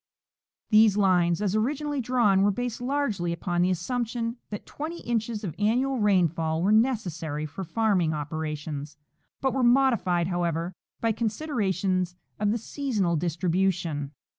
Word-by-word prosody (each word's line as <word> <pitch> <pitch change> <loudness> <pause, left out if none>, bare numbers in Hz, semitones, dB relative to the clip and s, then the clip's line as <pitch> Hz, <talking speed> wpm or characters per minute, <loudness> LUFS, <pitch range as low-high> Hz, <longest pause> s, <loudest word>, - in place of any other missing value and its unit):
These 215 -1 +6
lines, 180 -2 +3
as 200 -2 0
originall}^ 285 +5 0
drawn, 230 -6 +3
were 200 - +4
based 245 +3 -3
largely 245 -10 -1
upon 175 +1 -1
the 180 - +3
assumption 230 +5 -2
that 205 - -6
twenty 325 +3 -6
inches 225 -2 -2
of 175 -6 -3
annual 250 +5 +1
rainfall 170 -5 +2
were 200 - +3
necessary 175 - +1
for 160 +6 -6
farming 185 -3 +1
opera 155 +1 -3
tions, 150 0 -7 0.4
but 265 -2 +1
were 265 - 0
modified, 240 -9 +3
however, 175 0 -1 0.3
by 230 - +2
considerations 200 - -1 0.2
of 210 0 +1
the 220 - +1
sea 280 +5 -5
sonal 185 -9 +1
distribution. 170 -3 0
200 Hz, 140 wpm, -27 LUFS, 170-235 Hz, 0.4 s, These